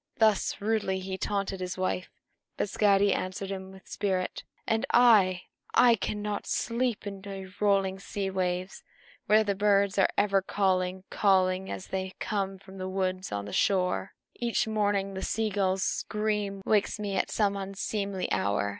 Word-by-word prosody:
Thus 215 -3 +2
rudely 205 -3 0
he 190 0 -4
taunted 195 0 -2
his 185 0 -4
wife; 185 0 -1 0.5
but 205 - -1
Skadi 200 -1 +4
answered 185 +1 -3
him 190 -1 -6
with 190 0 -15
spirit. 190 -3 -2 0.2
"And 225 +2 +1
I 205 -7 +5 0.3
I 245 0 +7
cannot 210 -1 -3
sleep 235 -1 -1
by 200 -1 -6
your 190 -1 -8
rolling 195 -2 +2
sea 195 0 -3
waves, 185 0 -2 0.4
where 215 +1 +5
the 205 -1 0
birds 200 0 +2
are 195 - +5
ever 195 -1 +3
calling, 185 -1 0
calling, 190 -1 +2
as 190 - -5
they 190 0 -3
come 195 -2 -2
from 190 0 -13
the 185 0 -3
woods 185 0 -2
on 100 0 -3
the 100 - -8
shore. 185 - +1 0.2
Each 235 -2 0
morning 205 -2 0
the 190 - -5
sea 220 +1 -1
gull's 190 -2 +1
scream 210 -2 -1
wakes 210 0 +2
me 205 -2 -2
at - - 0
some 205 -2 +1
unseemly 195 0 -3
hour. 100 0 +1
195 Hz, 160 wpm, -28 LUFS, 190-205 Hz, 0.5 s, I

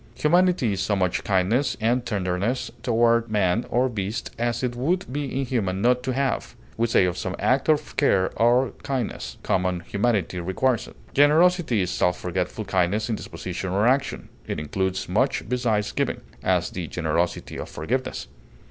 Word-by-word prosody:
Humanity 175 - +3
is 95 - -2
so 100 +2 +1
much 90 -2 0
kindness 105 +8 +1
and 120 +3 +1
tenderness 100 +3 -1
toward 115 -1 +2
man 105 +1 +1
or 125 +2 +2
beast 105 -2 -4
as 120 +1 -1
it 120 -1 -1
would 170 +10 0
be 145 0 -1 0.2
inhuman 110 -8 -1
not 125 +4 +3
to 130 0 -2
have; 135 -1 -1 0.2
we 115 +1 +1
say 110 - +4
of 90 -1 -2
some 95 +1 -3
act 130 +4 +1
of 155 -1 +1
care 95 -10 +3
or 120 +3 +3
kindness, 130 -5 -3
"common 90 -1 0
humanity 100 -2 0
requires 105 +8 0
it." - - -14 0.2
Generosity 155 - +4
is 90 0 -1
self 90 0 +1
forgetful 90 +4 -3
kindness 100 +4 0
in - - +1
disposition 90 -2 -5
or 100 +4 +1
action; 135 +2 +1 0.2
it - - -3
includes 95 +5 -2
much - - 0
besides 115 -4 0
giving; - - -1 0.2
as, 90 -2 +1
the 90 -3 -5
generosity 85 +1 -2
of - - -6
forgiveness. 130 +11 -3
110 Hz, 165 wpm, -24 LUFS, 95-125 Hz, 0.2 s, say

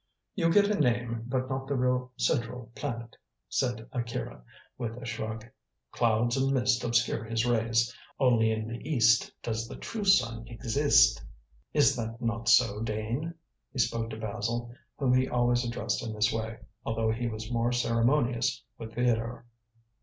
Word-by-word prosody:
"You 165 -4 +2
get 205 +3 +5
a 210 - 0
name, 120 -4 0
but 130 0 -1
not 135 0 -3
the 140 - -1
real 125 0 0
central 120 -3 -1
planet," 115 -5 -5 0.3
said 120 -4 -1
Akira, 115 - -4 0.3
with 115 -2 -4
a 125 - -8
shrug. 110 -1 -4 0.5
"Clouds 120 +1 +2
and 135 0 +1
mist 125 -1 +2
obscure 120 -1 +1
his 115 +1 -1
rays. 115 0 +1 0.2
Only 120 -4 +4
in 110 0 -2
the 115 +1 -5
East 115 -6 +3
does 115 0 -2
the - - -8
true 220 -2 -5
sun 115 - +3
exist. 120 - +3 0.5
Is - - +4
that 115 0 -4
not 115 -1 -1
so, 115 -3 +5
Dane?" 115 +9 -3 0.4
he - - -10
spoke 115 -1 0
to 110 - -6
Basil, 115 +2 -3 0.2
whom 130 -3 +2
he 130 0 +3
always 120 0 +2
addressed 120 0 -2
in 110 - -4
this 105 0 +2
way, 110 0 -3 0.3
although 110 0 0
he 120 +2 -2
was 110 0 -5
more 120 0 +1
ceremonious 120 - +1 0.2
with 110 0 -8
Theodore. 120 -1 0
120 Hz, 160 wpm, -29 LUFS, 115-125 Hz, 0.5 s, get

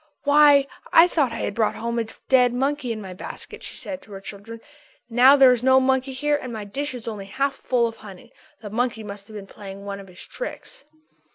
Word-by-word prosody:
"Why, 290 -1 +6 0.3
I 330 +2 +8
thought 290 -8 +1
I 230 - -5
had - - -2
brought 220 0 0
home 235 0 -2
a 230 - -1 0.2
dead 250 -2 +4
monkey 270 -1 -1
in 220 -1 -4
my 190 -1 -8
basket," 185 - -9
she - - -8
said 280 -1 -6
to 220 - -18
her 195 - -7
children. 205 +3 -9 0.5
"Now 255 +4 +7
there 270 -2 +7
is 245 -2 +1
no 260 +1 +5
monkey 265 0 +1
here 295 +3 0
and 250 - -6
my 220 -2 -5
dish 260 +7 -4
is 235 -2 -9
only 210 -3 -5
half 270 +7 -1
full 250 -3 0
of 225 -1 -4
honey. 195 -4 -13 0.3
The 210 -2 -8
monkey 235 -1 -1
must 200 -1 -9
have 215 - -12
been 200 -2 -7
playing 195 0 -10
one 200 0 -5
of 195 - -11
his 180 -1 -10
tricks." - - -8
240 Hz, 225 wpm, -23 LUFS, 210-270 Hz, 0.5 s, I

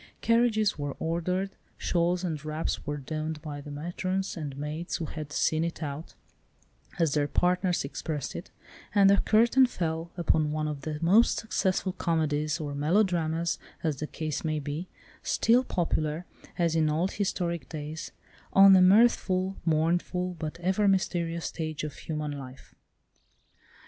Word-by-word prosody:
Carriages 230 -6 +2
were 145 -1 -3
ordered, 180 +4 -1 0.3
shawls 175 +1 0
and 160 -5 -3
wraps 155 -1 -3
were 145 0 -2
donned 155 +2 -4
by 145 -2 -6
the 145 - -10
matrons 180 +6 -3
and 145 -4 -5
maids 150 +4 -4
who 165 - -3
had 155 -1 -7
"seen 155 +2 +1
it 170 0 -3
out," 145 +2 -6 0.8
as 165 -4 +2
their 145 -1 +2
partners 180 +1 +1
expressed 145 0 -4
it, - - -7 0.5
and 195 -1 +7
the 200 - +5
curtain 235 +6 +4
fell 165 -5 -3
upon 155 -3 +2
one 155 0 -1
of 150 -2 -4
the 150 +1 -4
most 205 +8 +5
successful 190 -3 0
comedies 155 -3 0
or 145 -2 -4
melodramas, 165 +1 +1 0.2
as 155 -4 0
the 150 - -4
case 155 -3 -4
may 155 -1 0
be, 150 +5 -4 0.3
still 240 +3 +3
popular, 165 -5 -1 0.3
as 170 -2 +1
in 155 -1 +3
old 165 +5 0
historic 175 -4 -2
days, 155 0 -6 0.4
on 195 0 +9
the 185 - +7
mirthful, 190 -2 +4
mournful, 175 +3 +1
but 155 +1 -5
ever 190 +3 +2
mysterious 170 -3 0
stage 155 -2 -4
of 150 -2 -4
human 150 -2 -4
life. 135 -2 -9
165 Hz, 150 wpm, -28 LUFS, 150-185 Hz, 0.8 s, on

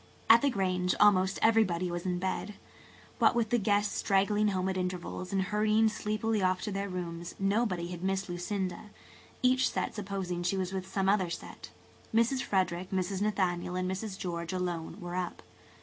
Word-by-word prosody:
At 230 +1 +8
the 285 - +3
Grange 185 -5 0
almost 195 -2 +5
everybody 185 -6 +3
was 175 +1 -4
in 180 -1 0
bed. 190 +3 -3 0.6
What - - +5
with 230 -2 0
the 240 - +3
guests 205 0 +1
straggling 205 +1 +2
home 190 -2 0
at 190 - -1
intervals 180 0 -4
and 195 -1 +1
hurrying 215 +2 +3
sleepily 215 0 -1
off 185 0 +2
to 210 - -3
their 200 0 -3
rooms, 170 -2 -5
nobody 195 -3 0
had 175 0 -7
missed 195 +1 0
Lucinda, 185 +2 -3 0.5
each 255 +1 +4
set 185 -1 -2
supposing 190 -4 -3
she 185 +2 0
was 185 0 -2
with 190 0 -4
some 195 -1 0
other 195 -3 +3
set. - - -8 0.5
Mrs. 235 +3 +3
Frederick, 185 -3 0
Mrs. 190 0 -1
Nathaniel 185 -4 0
and 185 0 -1
Mrs. 190 +1 -4
George 170 -2 -4
alone 175 -3 -3
were 175 0 -6
up. 180 -1 -3
190 Hz, 175 wpm, -30 LUFS, 180-210 Hz, 0.6 s, At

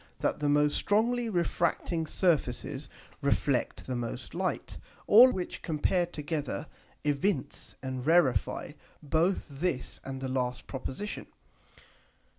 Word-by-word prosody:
that - - 0
the 145 -1 +1
most 145 0 +4
strongly 230 +3 +2
refracting 170 -2 0
Surfaces 145 -5 0 0.3
reflect 140 -2 0
the 130 - -3
most 120 -1 -5
Light: - - -2 0.3
All 245 +5 +9
which 185 -4 -4
compared 175 +2 0
together 150 -1 -3 0.4
evince 145 +1 -1
and 130 -1 -3
rarify 145 - +2 0.3
both 165 +6 +1
this 140 -2 -3
and 135 -1 -5
the 130 - -3
last 125 -1 -2
Proposition. 135 +9 -5
150 Hz, 110 wpm, -30 LUFS, 135-175 Hz, 0.4 s, All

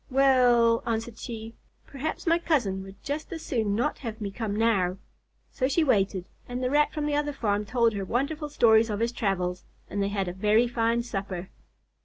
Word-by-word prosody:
"W 265 - -6
well," 240 -3 +5
answered 230 0 -3
she, 225 -1 -7 0.3
"perhaps 285 +3 -5
my 335 0 +3
cousin 240 - 0
would 195 +1 -12
just 295 +5 -4
as 330 -2 -6
soon 220 -6 0
not 245 +7 -1
have 225 -3 -6
me 205 -2 -4
come 210 0 -3
now." 200 -5 +2 0.5
So 260 - 0
she 300 +5 +2
waited, 195 - +1 0.2
and 250 +1 -3
the 250 - 0
Rat 295 +1 +3
from 300 -1 -3
the 295 - -1
other 295 0 0
farm 210 -5 -1
told 230 0 +2
her 200 -1 -3
wonderful 280 - -2
stories 225 -5 +4
of 205 -1 -2
his 230 +1 +1
travels, 185 -5 -1 0.3
and 200 - -1
they 200 - +1
had 200 -2 -1
a 175 - -3
very 210 +5 +3
fine 235 0 +1
supper. 195 -5 -5
230 Hz, 200 wpm, -27 LUFS, 200-260 Hz, 0.5 s, well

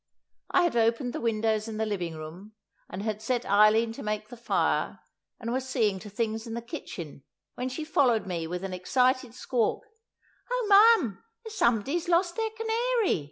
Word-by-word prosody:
I 365 - +3
had 345 -7 +1
opened 235 +2 +1
the - - -4
windows 220 -1 0
in 220 -1 -5
the 220 - 0
living 180 -6 -3
room, 165 +7 -9 0.4
and 195 - -6
had 215 -1 -3
set 245 +2 -1
Eileen 215 +3 +4
to - - -9
make 215 0 -3
the 245 - -9
fire, 235 0 0 0.4
and 230 0 -3
was 260 0 -2
seeing 215 -7 +1
to 210 - -10
things 220 +2 -3
in 225 - -5
the 235 - -3
kitchen, 165 - -8 0.3
when 250 +1 -3
she 260 +5 -5
followed 255 -8 +2
me 170 -4 -3
with 180 +2 -4
an 190 -1 -4
excited 250 +6 +1
squawk: 245 -4 0 0.7
"Oh, - - -1 0.3
ma'am, 225 - -5 0.2
there's 445 -2 -8
somebody 235 - +1
has 345 +1 -1
lost 345 0 +2
their 445 -1 -1
canary! 450 - 0
230 Hz, 185 wpm, -28 LUFS, 210-265 Hz, 0.7 s, Eileen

